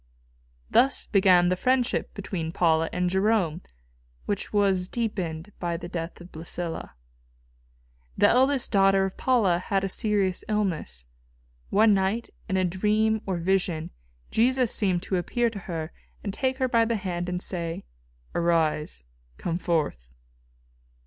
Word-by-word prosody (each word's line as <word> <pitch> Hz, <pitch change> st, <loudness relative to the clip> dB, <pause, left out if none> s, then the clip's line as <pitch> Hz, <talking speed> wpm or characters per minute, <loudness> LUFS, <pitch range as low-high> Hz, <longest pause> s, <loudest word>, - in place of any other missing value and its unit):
Thus 270 Hz, +2 st, +3 dB
began 185 Hz, -3 st, +4 dB
the 185 Hz, -, +2 dB
friendship 250 Hz, +5 st, +1 dB
between 185 Hz, -5 st, -4 dB
Paula 165 Hz, -2 st, +2 dB
and 180 Hz, 0 st, 0 dB
Jerome, 190 Hz, -3 st, +1 dB, 0.6 s
which 205 Hz, -, -3 dB
was 195 Hz, -3 st, +2 dB
deepened 190 Hz, -6 st, -3 dB
by 170 Hz, -1 st, -2 dB
the 175 Hz, -, -7 dB
death 170 Hz, -1 st, -5 dB
of 175 Hz, +1 st, -13 dB
Blæsilla. 165 Hz, +1 st, -5 dB, 1.2 s
This -, -, +6 dB
eldest 265 Hz, +1 st, +3 dB
daughter 195 Hz, -2 st, +4 dB
of 190 Hz, -, -5 dB
Paula 215 Hz, -9 st, +2 dB
had 195 Hz, +1 st, -1 dB
a 195 Hz, -, -1 dB
serious 195 Hz, -2 st, 0 dB
illness. 170 Hz, -, -2 dB, 0.6 s
One 215 Hz, +1 st, +5 dB
night, 195 Hz, +4 st, 0 dB, 0.2 s
in 190 Hz, -, +1 dB
a 185 Hz, -, +2 dB
dream 215 Hz, +4 st, +1 dB
or 190 Hz, -2 st, -1 dB
vision, 175 Hz, -2 st, 0 dB, 0.4 s
Jesus 250 Hz, +1 st, +2 dB
seemed 185 Hz, -4 st, +1 dB
to 190 Hz, -, -1 dB
appear 235 Hz, +6 st, 0 dB
to 205 Hz, -, -7 dB
her 160 Hz, -2 st, -4 dB, 0.3 s
and 200 Hz, -, -3 dB
take 260 Hz, +3 st, -1 dB
her 260 Hz, -1 st, +1 dB
by 230 Hz, -2 st, +3 dB
the 230 Hz, 0 st, 0 dB
hand 180 Hz, -4 st, -3 dB
and 180 Hz, 0 st, -2 dB
say, 170 Hz, -3 st, -3 dB, 0.5 s
"Arise, 160 Hz, -, 0 dB, 0.3 s
come 170 Hz, 0 st, -2 dB
forth." 145 Hz, -, -2 dB
190 Hz, 140 wpm, -26 LUFS, 170-215 Hz, 1.2 s, This